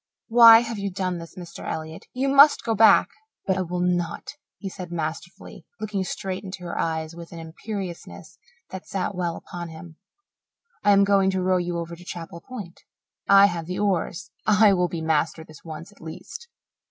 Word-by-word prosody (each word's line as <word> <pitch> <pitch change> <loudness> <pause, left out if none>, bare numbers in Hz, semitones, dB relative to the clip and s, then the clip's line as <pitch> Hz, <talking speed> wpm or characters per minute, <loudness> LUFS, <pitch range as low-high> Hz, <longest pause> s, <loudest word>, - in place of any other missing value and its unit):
"Why 230 -1 +9
have 230 -3 -5
you 200 0 -2
done 185 -2 -3
this, 165 0 -11
Mr. 175 -2 -9
Elliott? 160 0 -6
You 260 +2 -1
must 280 +2 +6
go 225 - 0
back." 220 +1 +6 0.4
"But 190 - +1
I 190 - -1
will 180 0 -3
not," 175 -2 -1 0.3
he 200 - -7
said 180 -2 -8
masterfully, 165 +1 -6 0.2
looking 205 -3 -2
straight 190 +1 -5
into 190 -2 -8
her 175 - -5
eyes 160 0 -2
with 170 -1 -10
an 170 - -9
imperiousness 165 - -8 0.3
that 190 0 -8
sat 195 0 -2
well 175 -2 -2
upon 175 -1 -8
him. 160 0 -11 0.9
"I 205 - +3
am 200 0 +6
going 195 -1 +3
to 190 -1 -1
row 185 0 +2
you 175 -1 -2
over 170 0 -5
to 175 - -14
Chapel 170 -2 -8
Point. 205 -8 -9 0.5
I 200 0 +8
have 170 -4 -2
the 180 - -4
oars 190 -2 -1 0.2
I 210 -1 +6
will 180 -1 +2
be 170 -1 -5
master 160 0 0
this 155 -2 -16
once, 165 +3 -9
at 205 - -21
least." 160 - -9
180 Hz, 190 wpm, -24 LUFS, 170-200 Hz, 0.9 s, Why